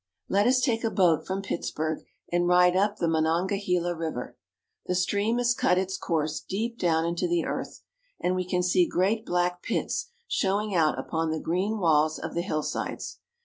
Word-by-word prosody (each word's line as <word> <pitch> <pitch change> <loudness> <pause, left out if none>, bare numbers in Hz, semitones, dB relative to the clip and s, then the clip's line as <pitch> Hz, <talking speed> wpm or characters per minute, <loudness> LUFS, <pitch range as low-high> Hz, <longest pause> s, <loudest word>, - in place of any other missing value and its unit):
Let 200 +3 +3
us 255 0 +4
take 235 -3 +1
a 225 - +2
boat 175 -7 +2
from 195 +1 -2
Pittsburg, 160 -4 -3 0.3
and 175 0 +2
ride 180 0 +5
up 205 +2 +2
the 170 - 0
Monongahela 175 +2 +1
River. 160 -6 -4 0.5
The 180 - 0
stream 205 +5 +1
has 245 0 +3
cut 180 - +2
its 190 0 -1
course 155 -4 -1
deep 230 +4 -4
down 165 -2 +2
into 170 +1 -1
the 170 -1 +1
earth; - - -5 0.4
and 180 - 0
we 185 - 0
can 180 -1 +1
see 180 -1 +3
great 210 +5 0
black 180 0 0
pits - - -2 0.2
showing 205 - 0
out 160 -4 +3
upon 160 -1 -2
the 160 0 -1
green 190 +8 -1
walls 155 -4 +3
of - - -6
the 170 - 0
hillsides. 155 -4 -3
180 Hz, 180 wpm, -27 LUFS, 165-200 Hz, 0.5 s, ride